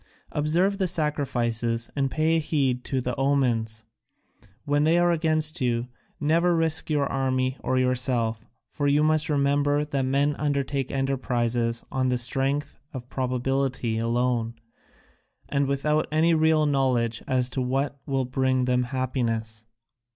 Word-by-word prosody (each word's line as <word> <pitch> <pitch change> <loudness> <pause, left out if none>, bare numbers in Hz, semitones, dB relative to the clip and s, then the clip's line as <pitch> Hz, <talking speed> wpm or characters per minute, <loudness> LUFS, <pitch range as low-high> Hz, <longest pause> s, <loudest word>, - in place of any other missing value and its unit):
Observe 175 +7 +1
the 190 - +1
sacrifices 120 -8 -1
and 135 -1 0
pay 160 +4 +1
heed 135 -5 0
to 130 -1 -2
the 125 0 -3
omens; 120 -6 0 0.8
when 145 0 +2
they 160 +2 +3
are 175 0 +3
against 155 -1 +2
you, 120 -1 0 0.3
never 170 +4 +2
risk 160 -1 0
your 145 -2 +1
army 130 -1 -1
or 130 - -1
yourself, 125 -3 0 0.3
for 145 -2 -1
you 145 +1 +3
must 155 +1 +2
remember 145 0 +1
that 140 -2 -2
men 140 +2 +1
undertake 140 -2 -1
enterprises 120 -3 -1
on 130 -1 0
the 125 - +1
strength 135 +4 -1
of 125 -2 -8
probability 130 -2 -1
alone 120 0 0 0.9
and 140 -1 0
without 150 +3 0
any 160 +2 +3
real 160 -1 +3
knowledge 125 -5 +1
as 130 -2 +2
to 130 +1 -2
what 135 +2 -1
will 135 -2 0
bring 130 0 0
them 125 0 +1
happiness. 115 -4 -3
135 Hz, 135 wpm, -25 LUFS, 125-150 Hz, 0.9 s, they